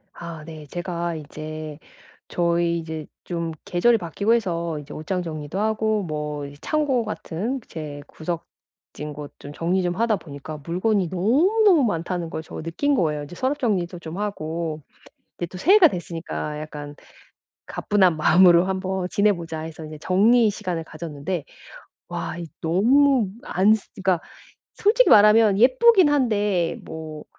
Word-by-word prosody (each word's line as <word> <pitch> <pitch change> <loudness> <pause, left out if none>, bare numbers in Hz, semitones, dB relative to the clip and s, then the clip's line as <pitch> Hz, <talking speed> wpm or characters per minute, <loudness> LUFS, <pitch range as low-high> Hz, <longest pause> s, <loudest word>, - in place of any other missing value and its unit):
아 170 -2 -8
네. 155 -2 -10
제가 175 +1 -3
이제 155 0 -7 0.5
저희 170 0 +1
이제 160 -2 -6 0.2
좀 170 -2 -3
계절이 230 +7 +3
바뀌고 200 +4 0
해서 170 -7 -2
이제 145 - -10
옷장 180 +4 -3
정리도 155 +1 -5
하고 220 0 +1
뭐 150 -3 -4
이 140 - -9
창고 285 - 0
같은 215 +3 -4
제 150 -3 -7
구석진 155 -2 -8
곳 145 0 -9
좀 145 - -9
정리 175 +4 0
좀 175 -1 -1
하다 225 +1 +1
보니까 150 -1 -8
물건이 185 +2 +1
너무너무 315 - +3
많다는 175 -4 -2
걸 160 - -5
저 - - -8
느낀 180 - 0
거예요. 150 - 0
인제 145 +5 -10
서랍 265 +6 -1
정리도 190 - -1
좀 165 +1 -7
하고 165 -5 -3 0.6
이제 175 - -3
또 185 - -10
새해가 360 - +6
됐으니까 165 -3 -5
'약간 150 -1 -8 0.7
가뿐한 190 -5 +2
마음으로 175 +2 +6
한번 190 -1 -2
지내보자.' 170 -6 0
해서 160 0 -7
이제 155 0 -8
정리의 215 +7 +4
시간을 185 -5 -3
가졌는데, 160 +1 -5 0.7
와 - - -4
이 170 -1 -6
너무 235 - +3 0.2
안 195 +4 +4
쓰 215 - -9
그니까 185 -3 +1 0.6
솔직히 450 +5 +4
말하면 210 -1 +6
예쁘기는 355 - +6
한데 205 -10 +1
뭐 155 -1 -8
175 Hz, 300 characters per minute, -23 LUFS, 160-210 Hz, 0.7 s, 새해가